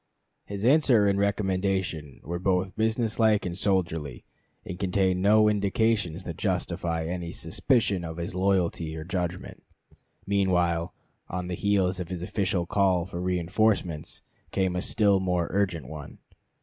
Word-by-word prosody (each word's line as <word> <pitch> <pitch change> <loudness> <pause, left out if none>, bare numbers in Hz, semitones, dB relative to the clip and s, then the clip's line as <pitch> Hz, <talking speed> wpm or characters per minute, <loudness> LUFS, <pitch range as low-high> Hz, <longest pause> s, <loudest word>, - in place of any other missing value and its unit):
His 100 +1 -4
answer 130 -6 +5
and 100 0 +2
recommendation 95 -7 -1
were 85 +3 -4
both 95 +1 0
business 110 +1 0
like 110 -2 +3
and 85 -1 -3
soldierly, 85 -9 -1 0.4
and 90 - -6
contained 95 -1 +1
no 105 +2 +5
indications 100 -3 +1
that 85 -3 -6
justify 80 -1 -1
any 85 0 -4
suspicion 100 - 0
of 80 0 -6
his 85 +1 -4
loyalty 90 -4 0
or 80 - -5
judgment. 90 0 -4 0.6
Meanwhile, 90 -3 +1 0.4
on 90 0 -4
the - - -2
heels 95 -1 +1
of 90 - -4
this 90 -1 -5
official 95 -2 -1
call 95 -2 +2
for 85 -1 -6
reënforcements, 90 -2 0 0.3
came 95 -2 0
a 90 - -1
still 100 -2 +3
more 90 -2 0
urgent 90 -8 -1
one. 75 +1 -9
90 Hz, 140 wpm, -27 LUFS, 85-100 Hz, 0.6 s, answer